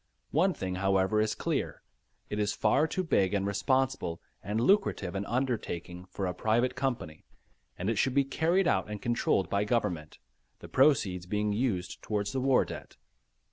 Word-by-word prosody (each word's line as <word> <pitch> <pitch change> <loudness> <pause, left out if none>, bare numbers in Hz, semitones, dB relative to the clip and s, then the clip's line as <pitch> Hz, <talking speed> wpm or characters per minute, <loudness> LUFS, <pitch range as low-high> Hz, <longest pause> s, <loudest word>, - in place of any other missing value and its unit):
One 180 +5 +2
thing 95 -1 -3
however, 95 +2 +2
is 110 0 0
clear. - - -2 0.4
It 105 - -3
is 105 0 +1
far 135 +8 +3
too 185 +3 -2
big 100 - +2
and 100 -1 0
responsible 130 - 0 0.2
and 105 +3 -1
lucrative 120 - +2
an 100 0 -3
undertaking 110 -8 -3
for 95 +1 -4
a 90 - -1
private 115 +7 +1
company, 125 - -3 0.5
and 90 - -3
it 110 -1 0
should 130 -1 +1
be 140 - +5
carried 165 +7 +1
out - - +1
and 105 -1 -5
controlled 120 -4 +1
by 100 0 +1
Government, 105 -9 -1 0.4
the - - -11
proceeds 100 -11 +2
being 105 +1 0
used 105 -5 -2
towards 105 -1 -2
the 130 - -2
war 135 0 +3
debt. - - -9
105 Hz, 170 wpm, -30 LUFS, 95-130 Hz, 0.5 s, be